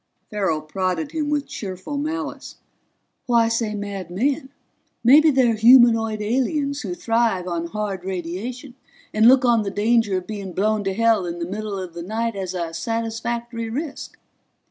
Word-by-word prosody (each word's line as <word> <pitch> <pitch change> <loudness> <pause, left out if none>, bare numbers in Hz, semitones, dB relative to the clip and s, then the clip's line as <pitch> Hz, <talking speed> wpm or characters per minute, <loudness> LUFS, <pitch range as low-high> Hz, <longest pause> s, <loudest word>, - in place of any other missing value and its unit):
Farrell 190 -7 0
prodded 180 0 -2
him 305 -2 -2
with 295 -1 0
cheerful 190 +7 -6
malice. 310 +4 -4 0.7
"Why 235 -2 +3
say 230 -2 -1
mad 200 -3 -5
men? 265 +8 -1 0.5
Maybe 295 +6 +7
they're 260 -5 +3
humanoid 225 -2 +5
aliens 275 +5 0
who 180 -4 -4
thrive 225 -4 0
on 170 -1 -2
hard 200 -1 -4
radiation 190 - -5 0.4
and 220 +1 +5
look 255 +1 +6
on 235 -2 +4
the 205 - -2
danger 210 0 +2
of 185 - -5
being 200 -4 -6
blown 210 +2 +1
to 195 -1 -1
hell 225 -4 +2
in 170 0 -4
the 170 - -3
middle 205 +2 -4
of 185 -3 -6
the 170 - -7
night 225 +5 -2
as 190 -1 -4
a 170 -2 -3
satisfactory 230 +3 -3
risk." 280 +5 -5
220 Hz, 160 wpm, -22 LUFS, 190-240 Hz, 0.7 s, Maybe